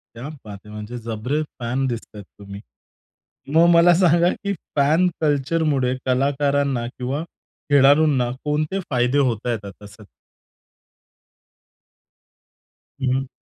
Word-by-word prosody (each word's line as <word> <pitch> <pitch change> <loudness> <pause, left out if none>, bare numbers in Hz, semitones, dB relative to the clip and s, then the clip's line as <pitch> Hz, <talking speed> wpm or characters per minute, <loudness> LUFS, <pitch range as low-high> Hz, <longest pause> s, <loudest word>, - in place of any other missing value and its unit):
क्या 120 +5 -7 0.2
बात 100 -2 -9
है! 105 - -12
म्हणजे 105 +3 -7
जबरे 125 +7 -2 0.2
फॅन 125 +3 -1
दिसतायेत 110 -4 -6 0.2
तुम्ही. 100 0 -9 0.9
मग 170 +1 +6
मला 170 +1 +6
सांगा 175 0 +4
की 200 - 0 0.2
फॅन 155 +6 +3
कल्चरमुळे 145 -3 +1
कलाकारांना 140 -1 0
किंवा 130 +4 -4 0.5
खेळाडूंना 140 -2 +4
कोणते 150 +6 -1
फायदे 125 +2 +1
होतायेत 120 -4 -1
आता 100 +1 -11
सध्या? 105 0 -15 3.0
हं, 130 -1 +1
हं. 135 0 -2
135 Hz, 105 wpm, -21 LUFS, 120-150 Hz, 3.0 s, मग